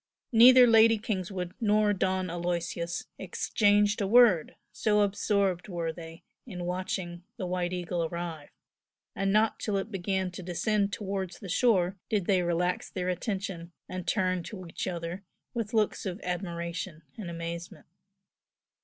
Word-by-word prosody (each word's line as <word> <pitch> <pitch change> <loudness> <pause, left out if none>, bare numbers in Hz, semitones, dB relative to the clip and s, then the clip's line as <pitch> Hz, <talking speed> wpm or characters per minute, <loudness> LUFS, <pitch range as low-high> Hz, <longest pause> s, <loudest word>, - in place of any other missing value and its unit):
Neither 250 +2 +9
Lady 225 -1 +6
Kingswood 185 -4 -3
nor 210 -1 +3
Don 185 -1 0
Aloysius 170 0 -3
exchanged 205 0 +2
a 200 - +1
word, 220 -7 +5 0.2
so 210 -1 +2
absorbed 200 -2 +1
were 170 -4 -3
they 165 0 -10 0.2
in 180 -6 -6
watching 180 -1 -3 0.2
the 190 - -3
"White 180 -1 -1
Eagle" 175 -1 -2
arrive, 165 -3 -5 0.7
and 195 0 0
not 215 +2 +2
till 205 -2 -1
it 195 +3 -4
began 190 -1 -1
to 175 - -8
descend 200 +4 0
towards 190 -2 -4
the 195 - -9
shore 190 -3 +2
did 205 -4 0
they 190 -1 +3
relax 175 +1 0
their 180 -1 -3
attention 180 -2 -4
and 185 -1 -6
turn 185 -3 +1
to 185 +1 -8
each 165 - -5
other 175 +1 -4 0.3
with 230 -3 -3
looks 215 -2 0
of 185 +1 -4
admiration 170 -2 -4
and 200 -6 -6
amazement. 170 -2 -6
185 Hz, 145 wpm, -29 LUFS, 175-205 Hz, 0.7 s, Neither